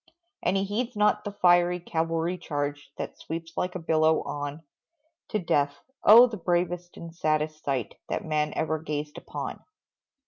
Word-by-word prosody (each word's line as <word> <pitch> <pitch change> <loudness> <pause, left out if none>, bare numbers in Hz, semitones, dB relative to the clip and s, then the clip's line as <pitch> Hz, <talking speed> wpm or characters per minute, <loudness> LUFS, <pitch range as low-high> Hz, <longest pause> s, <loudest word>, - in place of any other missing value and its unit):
And 185 +2 +1
he 195 - +1
heeds 230 +5 -2
not 210 0 +2
the 205 - -3
fiery 175 -2 +4
cavalry 165 +1 -1
charge, 145 -4 -4
That - - -6
sweeps 165 +1 -6
like 180 0 -2
a - - -2
billow 160 -1 +3
on 145 +2 -5 0.6
To 215 - -1
death, 145 -6 +1 0.3
oh, 230 +4 +10
the 230 -3 -4
bravest 175 0 -1
and 165 -1 -8
saddest 155 -1 -1
sight, 135 -4 -2
That - - -2
man 150 -1 0
ever 160 0 0
gazed 150 -1 -4
upon! - - -6
165 Hz, 160 wpm, -27 LUFS, 155-180 Hz, 0.6 s, oh